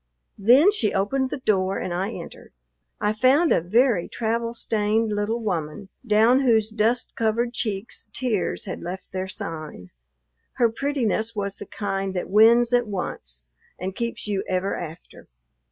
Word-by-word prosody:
Then 255 Hz, -, +6 dB
she 230 Hz, -, 0 dB
opened 260 Hz, +7 st, 0 dB
the -, -, -3 dB
door, 195 Hz, -5 st, +1 dB
and 180 Hz, -, -3 dB
I 185 Hz, +3 st, -1 dB
entered. -, -, -10 dB, 0.5 s
I 210 Hz, -, +1 dB
found 265 Hz, +9 st, +4 dB
a -, -, +4 dB
very 220 Hz, +2 st, +2 dB
travel 230 Hz, +1 st, -2 dB
stained 220 Hz, 0 st, 0 dB
little 210 Hz, +3 st, -1 dB
woman, 180 Hz, -3 st, -3 dB
down 225 Hz, +3 st, +4 dB
whose 225 Hz, -5 st, +2 dB
dust 225 Hz, +3 st, 0 dB
covered 235 Hz, +2 st, 0 dB
cheeks 215 Hz, -2 st, -3 dB
tears 230 Hz, -5 st, -1 dB
had 190 Hz, -, -6 dB
left 180 Hz, +2 st, -7 dB
their 185 Hz, 0 st, -3 dB
sign. 155 Hz, -, -7 dB, 0.6 s
Her 235 Hz, -2 st, +2 dB
prettiness 230 Hz, -4 st, -1 dB
was 200 Hz, -1 st, -3 dB
the 205 Hz, -, -9 dB
kind 195 Hz, -2 st, -3 dB
that 180 Hz, -, -3 dB
wins 230 Hz, +3 st, +5 dB
at 245 Hz, -1 st, +3 dB
once 65 Hz, -, -5 dB, 0.3 s
and 185 Hz, +1 st, -5 dB
keeps 235 Hz, 0 st, -3 dB
you 200 Hz, -2 st, -1 dB
ever 185 Hz, +1 st, 0 dB
after. 165 Hz, 0 st, -9 dB
215 Hz, 155 wpm, -24 LUFS, 190-235 Hz, 0.6 s, Then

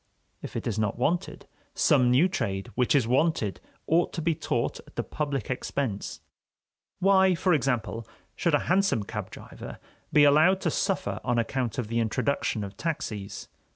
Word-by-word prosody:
If -, -, -8 dB
it -, -, -3 dB
is 110 Hz, -2 st, -1 dB
not 105 Hz, -1 st, 0 dB
wanted, 160 Hz, +8 st, -1 dB, 0.3 s
some 125 Hz, -4 st, +4 dB
new 130 Hz, +9 st, +5 dB
trade 100 Hz, -, -3 dB
which 125 Hz, +6 st, +2 dB
is 130 Hz, -5 st, +3 dB
wanted 130 Hz, -, +1 dB, 0.3 s
ought 170 Hz, +2 st, +2 dB
to 165 Hz, -, -3 dB
be 165 Hz, 0 st, +2 dB
taught -, -, -2 dB
at -, -, -18 dB
the -, -, -1 dB
public 140 Hz, -5 st, -3 dB
expense. 125 Hz, -4 st, -3 dB, 0.8 s
Why, 190 Hz, -1 st, +4 dB
for 180 Hz, +1 st, +2 dB
example, 120 Hz, -5 st, -1 dB, 0.3 s
should 170 Hz, -4 st, +2 dB
a -, -, +3 dB
hansom 190 Hz, -, +2 dB
cab -, -, -5 dB
driver -, -, -10 dB, 0.3 s
be 150 Hz, -, +6 dB
allowed 155 Hz, +6 st, +5 dB
to -, -, 0 dB
suffer 105 Hz, -, -1 dB
on 120 Hz, 0 st, 0 dB
account 120 Hz, 0 st, -1 dB
of 125 Hz, -4 st, -2 dB
the 115 Hz, +1 st, -1 dB
introduction 115 Hz, 0 st, 0 dB
of 100 Hz, 0 st, -8 dB
taxies? 105 Hz, -11 st, -4 dB
130 Hz, 165 wpm, -27 LUFS, 115-165 Hz, 0.8 s, be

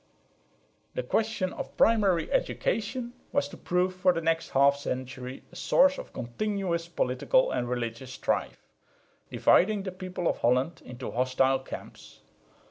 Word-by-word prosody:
The -, -, -1 dB
question 215 Hz, -4 st, 0 dB
of -, -, -7 dB
primary 200 Hz, -7 st, +3 dB
education 245 Hz, -, -1 dB, 0.2 s
was 140 Hz, -, +1 dB
to -, -, -10 dB
prove 180 Hz, +1 st, 0 dB
for 185 Hz, 0 st, +3 dB
the 170 Hz, -, -1 dB
next 165 Hz, 0 st, 0 dB
half 140 Hz, +1 st, +4 dB
century 130 Hz, -1 st, -5 dB
a -, -, -15 dB
source 280 Hz, +1 st, +4 dB
of -, -, -9 dB
continuous 170 Hz, -, -2 dB
political 170 Hz, -, +1 dB
and 120 Hz, -, -1 dB
religious 120 Hz, +1 st, -3 dB
strife, -, -, -2 dB, 0.6 s
dividing 200 Hz, +1 st, +3 dB
the 190 Hz, -, -4 dB
people 185 Hz, -1 st, -4 dB
of -, -, 0 dB
Holland 130 Hz, +7 st, +1 dB
into 125 Hz, 0 st, -7 dB
hostile 130 Hz, +1 st, +2 dB
camps. 130 Hz, -, -10 dB
170 Hz, 135 wpm, -28 LUFS, 130-200 Hz, 0.6 s, half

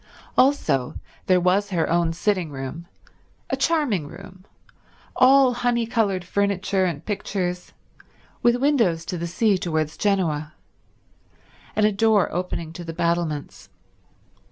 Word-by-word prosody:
Also 255 Hz, -, +2 dB, 0.3 s
there 185 Hz, -1 st, +4 dB
was 190 Hz, +3 st, +2 dB
her 170 Hz, -4 st, 0 dB
own 170 Hz, -1 st, +1 dB
sitting 180 Hz, 0 st, -1 dB
room, 140 Hz, +5 st, -7 dB, 0.6 s
a -, -, +2 dB
charming 270 Hz, -, 0 dB
room, 190 Hz, +2 st, -13 dB, 0.7 s
all 260 Hz, 0 st, +5 dB
honey 240 Hz, -1 st, 0 dB
coloured 210 Hz, -6 st, 0 dB
furniture 195 Hz, 0 st, 0 dB
and 170 Hz, -5 st, -3 dB
pictures, 185 Hz, -3 st, -3 dB, 0.7 s
with 240 Hz, 0 st, +4 dB
windows 240 Hz, -, +1 dB
to 180 Hz, -, -4 dB
the 170 Hz, -, -3 dB
sea 200 Hz, +2 st, +1 dB
towards 155 Hz, -3 st, -2 dB
Genoa, 160 Hz, -7 st, 0 dB, 1.2 s
and 215 Hz, -, +3 dB
a 215 Hz, -, +3 dB
door 210 Hz, -1 st, +2 dB
opening 175 Hz, -2 st, -3 dB
on -, -, -12 dB
to 175 Hz, -, -8 dB
the 165 Hz, -1 st, -6 dB
battlements. 170 Hz, -3 st, -2 dB
185 Hz, 130 wpm, -23 LUFS, 170-215 Hz, 1.2 s, all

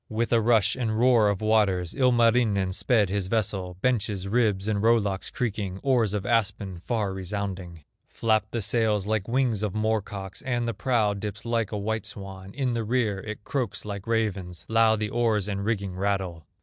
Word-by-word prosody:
With 115 Hz, +2 st, -1 dB
a 115 Hz, -, +4 dB
rush 110 Hz, -2 st, +3 dB
and 115 Hz, -4 st, -1 dB
roar 120 Hz, -3 st, +5 dB
of 100 Hz, -1 st, -2 dB
waters 100 Hz, -5 st, +2 dB
Ilmarinen 115 Hz, -6 st, +3 dB
sped 105 Hz, +1 st, +2 dB
his 100 Hz, -1 st, -1 dB
vessel, 95 Hz, -4 st, -1 dB
Benches, 105 Hz, -6 st, 0 dB
ribs, 105 Hz, -3 st, +1 dB
and 105 Hz, -2 st, 0 dB
row 115 Hz, +2 st, +5 dB
locks 100 Hz, -3 st, -2 dB
creaking, 100 Hz, -5 st, -3 dB
Oars 120 Hz, -7 st, +2 dB
of 100 Hz, -, -3 dB
aspen 100 Hz, -5 st, 0 dB
far 105 Hz, 0 st, -2 dB
resounding; 95 Hz, -3 st, -5 dB, 0.2 s
Flap 110 Hz, -2 st, +1 dB
the 115 Hz, -2 st, -2 dB
sails 105 Hz, -1 st, +1 dB
like 110 Hz, -2 st, -1 dB
wings 120 Hz, -4 st, +1 dB
of 105 Hz, -2 st, -2 dB
moor 110 Hz, 0 st, +1 dB
cocks, 95 Hz, -1 st, -7 dB
And 120 Hz, -3 st, -1 dB
the 115 Hz, -, -1 dB
prow 110 Hz, -2 st, +1 dB
dips 105 Hz, +2 st, -6 dB
like 115 Hz, -3 st, 0 dB
a 105 Hz, -, -2 dB
white 110 Hz, +2 st, -2 dB
swan; 95 Hz, -2 st, -9 dB
In 130 Hz, -3 st, 0 dB
the 115 Hz, -1 st, -1 dB
rear 110 Hz, -3 st, 0 dB
it 110 Hz, +1 st, -7 dB
croaks 115 Hz, -8 st, -3 dB
like 100 Hz, -1 st, -6 dB
ravens, 100 Hz, -6 st, -2 dB
Loud 110 Hz, -1 st, +3 dB
the 105 Hz, -, -1 dB
oars 110 Hz, -4 st, +1 dB
and 100 Hz, -1 st, -3 dB
rigging 100 Hz, -4 st, -2 dB
rattle. 95 Hz, -5 st, -2 dB
105 Hz, 185 wpm, -26 LUFS, 100-115 Hz, 0.2 s, roar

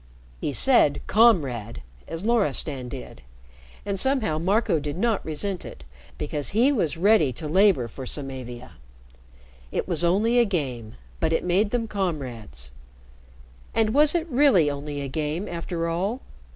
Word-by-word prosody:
He -, -, -2 dB
said 150 Hz, -, +4 dB
"Comrade" 140 Hz, -, +2 dB, 0.2 s
as 165 Hz, +4 st, -5 dB
Loristan 150 Hz, -, 0 dB
did, 130 Hz, 0 st, -9 dB, 0.6 s
and 200 Hz, -1 st, -2 dB
somehow 225 Hz, -, +1 dB
Marco 195 Hz, 0 st, +1 dB
did 145 Hz, +2 st, -5 dB
not 225 Hz, 0 st, 0 dB
resent 180 Hz, +4 st, -3 dB
it, -, -, -10 dB, 0.3 s
because 145 Hz, -1 st, -3 dB
he 265 Hz, +4 st, +5 dB
was 170 Hz, -, 0 dB
ready 180 Hz, -6 st, +4 dB
to 155 Hz, +5 st, -6 dB
labor 185 Hz, -, +3 dB
for 130 Hz, +3 st, -8 dB
Samavia. 130 Hz, -3 st, -5 dB, 1.0 s
It -, -, -2 dB
was 175 Hz, -3 st, -1 dB
only 215 Hz, +8 st, +3 dB
a -, -, +6 dB
game, 130 Hz, -, -3 dB, 0.2 s
but -, -, 0 dB
it 165 Hz, -, +1 dB
made 185 Hz, +4 st, +2 dB
them 230 Hz, 0 st, -1 dB
comrades 130 Hz, -, -4 dB, 1.0 s
and 220 Hz, -1 st, +2 dB
was 300 Hz, +3 st, +5 dB
it 335 Hz, -2 st, +1 dB
really 245 Hz, -, +4 dB
only 145 Hz, 0 st, -5 dB
a 140 Hz, -, -4 dB
game, 155 Hz, +6 st, -3 dB
after 170 Hz, 0 st, -3 dB
all? 195 Hz, +10 st, -2 dB
170 Hz, 145 wpm, -25 LUFS, 140-215 Hz, 1.0 s, a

